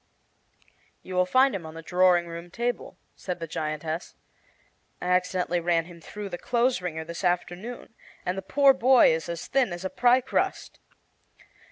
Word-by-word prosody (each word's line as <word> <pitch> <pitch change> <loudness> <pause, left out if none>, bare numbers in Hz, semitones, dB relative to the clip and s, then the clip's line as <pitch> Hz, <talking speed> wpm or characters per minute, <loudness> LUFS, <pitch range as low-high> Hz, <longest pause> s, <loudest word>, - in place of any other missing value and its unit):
"You 185 - -8
will 180 0 +2
find 260 +6 +4
him 190 -3 -4
on 160 0 -9
the 165 - -8
drawing 180 0 +3
room 170 +1 -8
table," 240 +5 -3 0.2
said 180 -2 -5
the 165 - -4
giantess. 155 +1 -4 0.8
"I - - -6
accidently 180 -1 +1
ran 170 -1 +1
him 170 -1 -13
through 205 +4 -7
the 175 - -6
clothes 245 -2 +1
wringer 160 -3 -4
this 170 +3 -7
afternoon, 180 +7 -2 0.3
and 180 - -1
the 195 - -4
poor 275 +8 +4
boy 260 -6 +5
is 160 +1 -3
as 170 -1 -4
thin 265 -7 +1
as 175 +2 -6
a 190 - -2
pie 250 +1 +4
crust. 255 - -2
180 Hz, 170 wpm, -26 LUFS, 170-235 Hz, 0.8 s, boy